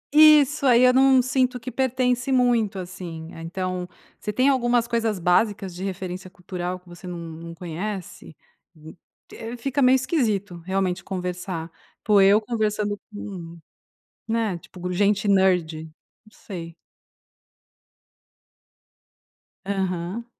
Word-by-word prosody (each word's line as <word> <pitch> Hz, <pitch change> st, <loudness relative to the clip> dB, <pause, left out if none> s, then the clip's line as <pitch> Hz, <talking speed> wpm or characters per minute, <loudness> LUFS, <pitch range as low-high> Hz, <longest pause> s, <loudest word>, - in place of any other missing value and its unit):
Isso, 300 Hz, -2 st, +7 dB
aí 245 Hz, -1 st, +6 dB
eu 250 Hz, 0 st, +6 dB
não 265 Hz, 0 st, +6 dB
sinto 255 Hz, 0 st, +1 dB
que 245 Hz, +2 st, -7 dB
pertence 255 Hz, -1 st, 0 dB
muito, 240 Hz, -5 st, +2 dB
assim, 175 Hz, -3 st, -7 dB
então 180 Hz, +2 st, -4 dB, 0.3 s
você 210 Hz, -, -3 dB
tem 255 Hz, +6 st, +2 dB
algumas 240 Hz, -3 st, +2 dB
coisas 230 Hz, -3 st, 0 dB
básicas 190 Hz, +2 st, +1 dB
de 180 Hz, +2 st, -7 dB
referência 185 Hz, -1 st, -5 dB
cultural 180 Hz, 0 st, -5 dB
que 180 Hz, -, -29 dB
você 175 Hz, +1 st, -11 dB
não 175 Hz, -1 st, -5 dB
não 165 Hz, 0 st, -8 dB
conhece, 180 Hz, 0 st, -6 dB, 1.2 s
fica 275 Hz, +4 st, -1 dB
meio 255 Hz, +1 st, +6 dB
esquisito 220 Hz, -, 0 dB
realmente 190 Hz, -1 st, -1 dB
conversar, 180 Hz, -3 st, -4 dB, 0.3 s
pô 205 Hz, -2 st, +5 dB
eu 200 Hz, +2 st, +6 dB
conversando 210 Hz, -2 st, -1 dB, 0.2 s
com 180 Hz, -5 st, -8 dB, 0.7 s
né, 220 Hz, -5 st, 0 dB
tipo 180 Hz, +1 st, -7 dB
gente 205 Hz, +3 st, +2 dB
nerd, 180 Hz, -5 st, +2 dB, 0.4 s
não 215 Hz, -, -20 dB
sei. 170 Hz, -6 st, -8 dB, 2.9 s
Aham. 190 Hz, +2 st, -2 dB
195 Hz, 115 wpm, -24 LUFS, 180-240 Hz, 2.9 s, Isso